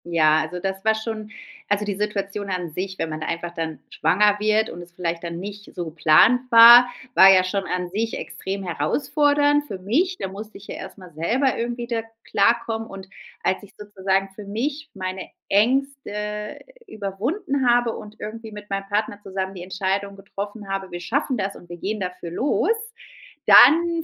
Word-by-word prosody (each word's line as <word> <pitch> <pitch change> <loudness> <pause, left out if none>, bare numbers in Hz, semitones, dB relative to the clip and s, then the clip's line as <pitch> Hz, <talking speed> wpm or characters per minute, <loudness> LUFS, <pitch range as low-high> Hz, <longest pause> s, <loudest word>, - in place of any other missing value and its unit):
Ja, 155 -2 +3
also, 180 +3 -5
das 195 +1 -4
war 220 0 +3
schon 220 -1 -5 0.4
also, 205 0 +1
die 205 -1 -2
Situation 200 0 -3
an 180 -3 -3
sich, 185 +3 -5
wenn 165 - -2
man 155 0 -5
da - - -4
einfach 170 +1 -4
dann 160 -4 -4
schwanger 205 +6 +2
wird 215 +1 +2
und 175 - -8
es 175 0 -13
vielleicht 170 -1 -4
dann 170 0 -5
nicht 205 +2 -9
so 175 - -3
geplant 160 +10 +4
war, 235 +2 +10 0.2
war 190 -3 +8
ja 185 -1 +5
schon 195 +1 -1
an 180 -1 -3
sich 225 +3 -2
extrem 195 +1 -5
herausfordernd 290 - +1
für 195 - -5
mich. 320 - 0
Da - - -3
musste 210 +3 -9
ich 200 - -15
ja - - -6
erst 190 - -9
mal 185 -3 -13
selber 240 - +1
irgendwie 240 0 -3
da 230 -1 -1 0.2
klarkommen. 225 +1 +1
Und 195 -1 -9 0.4
als 185 - 0
ich 205 - -14
sozusagen 195 -2 -1
für 210 - -9
mich 275 +10 -4
meine 185 -1 -5 0.2
Ängste 210 -3 -1 0.3
überwunden 250 - -2
habe 240 -1 +2
und 210 0 -10
irgendwie 220 +1 -7
mit 210 0 -10
meinem 195 0 -3
Partner 205 0 -1
zusammen 190 0 -4
die 180 -2 -8
Entscheidung 195 +1 -2
getroffen 205 +1 -7
habe, 195 -1 -4
wir 175 - -5
schaffen 260 - -1
das 195 -1 -3
und 175 - -15
wir 175 - -8
gehen 210 +5 -3
dafür 180 -2 -5
los, 270 - +1 0.8
dann 335 +1 +7
200 Hz, 180 wpm, -23 LUFS, 185-225 Hz, 0.8 s, war